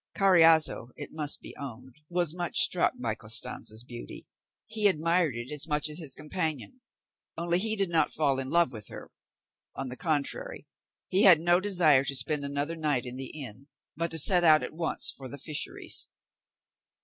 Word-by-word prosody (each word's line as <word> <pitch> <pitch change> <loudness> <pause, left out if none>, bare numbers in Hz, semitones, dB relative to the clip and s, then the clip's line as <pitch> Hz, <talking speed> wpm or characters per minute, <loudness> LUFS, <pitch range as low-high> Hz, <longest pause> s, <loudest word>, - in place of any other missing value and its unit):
Carriazo, 165 - +4
it 145 - -8
must 150 -2 -1
be - - -9
owned, 130 -1 -10
was 175 -3 0
much 175 -1 -4
struck 180 - +3
by 115 -3 -2
Costanza's 110 0 -1
beauty; 120 -1 -9 0.4
he 215 -1 +2
admired 170 -4 +1
it 120 +4 -6
as 150 +1 -1
much 150 0 -1
as 150 - -6
his 150 -6 -7
companion, 150 - -4 0.6
only 170 +1 +2
he 220 +2 +2
did 195 -4 -1
not 165 -1 +1
fall 140 -4 0
in 130 0 -4
love 170 -4 +2
with 110 -4 -6
her; - - -11 0.6
on 130 - -5
the 125 - -5
contrary, 165 - -3 0.4
he 195 +3 +5
had 180 -5 +8
no 175 +2 +3
desire 175 -9 +3
to 140 - +1
spend 145 +3 -1
another 140 +3 -3
night 150 -6 -1
in 125 0 -6
the 130 0 -3
inn, 135 -2 -7 0.3
but 170 +2 -2
to 160 - 0
set 175 +3 +4
out 155 -2 +5
at - - -5
once 165 +1 +1
for 130 -2 -6
the 140 - -8
fisheries. 150 +2 -3
155 Hz, 180 wpm, -28 LUFS, 135-170 Hz, 0.6 s, had